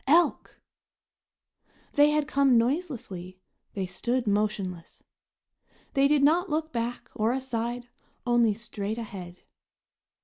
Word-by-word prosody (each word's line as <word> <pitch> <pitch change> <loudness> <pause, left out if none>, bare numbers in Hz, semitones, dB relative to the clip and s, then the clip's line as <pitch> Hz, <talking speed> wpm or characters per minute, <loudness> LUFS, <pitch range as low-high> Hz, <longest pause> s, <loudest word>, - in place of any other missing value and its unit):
Elk! 335 +5 +3 1.3
They 290 0 +6
had 300 -1 +1
come 275 -4 +4
noiselessly, 230 - -2 0.4
they 195 -2 -1
stood 235 +8 -1
motionless. 205 -4 -2 0.9
They 275 0 +4
did 290 -1 +3
not 340 +6 +4
look 315 +1 -1
back 235 +1 -3
or 220 +2 +1
aside, 245 -2 -3 0.4
only 240 -3 +3
straight 215 -1 -4
ahead. 185 -6 -8
240 Hz, 105 wpm, -27 LUFS, 205-280 Hz, 1.3 s, They